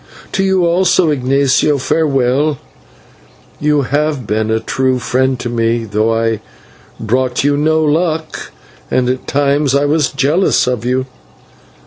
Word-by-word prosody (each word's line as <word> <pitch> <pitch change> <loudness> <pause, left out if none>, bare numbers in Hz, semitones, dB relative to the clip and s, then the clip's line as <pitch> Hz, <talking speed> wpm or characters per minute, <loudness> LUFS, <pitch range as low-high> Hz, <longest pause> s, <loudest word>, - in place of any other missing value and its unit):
To 195 - 0
you 190 -2 +2
also, 175 -1 +2
Ignatio, 140 +1 +1
farewell. 140 0 0 1.0
You 150 -1 +1
have 145 -1 -1
been 110 +2 -1
a 110 0 +1
true 130 +3 -1
friend 130 +1 0
to - - -4
me, 115 -1 -1
though 110 +1 0
I 115 -1 0 0.6
brought 125 +3 -1
you 145 0 +2
no 155 +2 +1
good 150 - +2
luck, 160 -1 -2 0.4
and 125 -1 +1
at 130 +1 -3
times 140 0 +1
I 140 +1 +2
was 150 -1 +1
jealous 145 +8 +1
of 125 -2 -2
you. 130 +1 0
135 Hz, 140 wpm, -15 LUFS, 125-150 Hz, 1.0 s, you